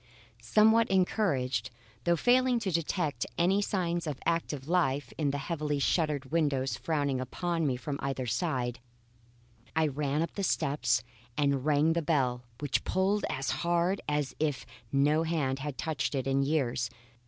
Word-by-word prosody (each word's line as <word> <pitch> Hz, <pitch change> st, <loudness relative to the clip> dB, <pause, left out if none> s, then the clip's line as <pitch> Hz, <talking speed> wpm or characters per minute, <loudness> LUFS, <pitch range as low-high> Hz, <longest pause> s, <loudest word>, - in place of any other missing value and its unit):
Somewhat 220 Hz, -, +4 dB
encouraged, 140 Hz, -, +1 dB, 0.4 s
though 170 Hz, -, +4 dB
failing 250 Hz, +6 st, +3 dB
to 195 Hz, -4 st, -1 dB
detect 155 Hz, -5 st, -1 dB
any 190 Hz, +4 st, +3 dB
signs 175 Hz, -4 st, -1 dB
of 145 Hz, -3 st, -3 dB
active 150 Hz, -5 st, -1 dB
life 155 Hz, -5 st, +1 dB
in 150 Hz, -3 st, 0 dB
the 140 Hz, -, -1 dB
heavily 150 Hz, 0 st, -2 dB
shuttered 145 Hz, -2 st, 0 dB
windows 145 Hz, -5 st, +1 dB
frowning 145 Hz, -5 st, -1 dB
upon 165 Hz, +5 st, -1 dB
me 130 Hz, -2 st, 0 dB
from 140 Hz, +3 st, -4 dB
either 135 Hz, -2 st, -2 dB
side, 125 Hz, -, -1 dB, 1.0 s
I 160 Hz, 0 st, +3 dB
ran 145 Hz, +1 st, 0 dB
up 170 Hz, -, -5 dB
the 200 Hz, -, -3 dB
steps 140 Hz, -, +1 dB, 0.3 s
and 140 Hz, -2 st, +1 dB
rang 155 Hz, +2 st, +3 dB
the 170 Hz, -, 0 dB
bell 135 Hz, -6 st, +1 dB, 0.2 s
which 145 Hz, -3 st, 0 dB
pulled 195 Hz, +2 st, +1 dB
as 130 Hz, 0 st, -2 dB
hard 175 Hz, +3 st, +1 dB
as 150 Hz, -2 st, -1 dB
if 150 Hz, -3 st, -1 dB, 0.3 s
no 145 Hz, +3 st, +3 dB
hand 150 Hz, -5 st, 0 dB
had 145 Hz, -1 st, -5 dB
touched 155 Hz, -2 st, -2 dB
it 130 Hz, -, -1 dB
in 135 Hz, 0 st, +2 dB
years. 135 Hz, -5 st, 0 dB
150 Hz, 155 wpm, -30 LUFS, 135-170 Hz, 1.0 s, Somewhat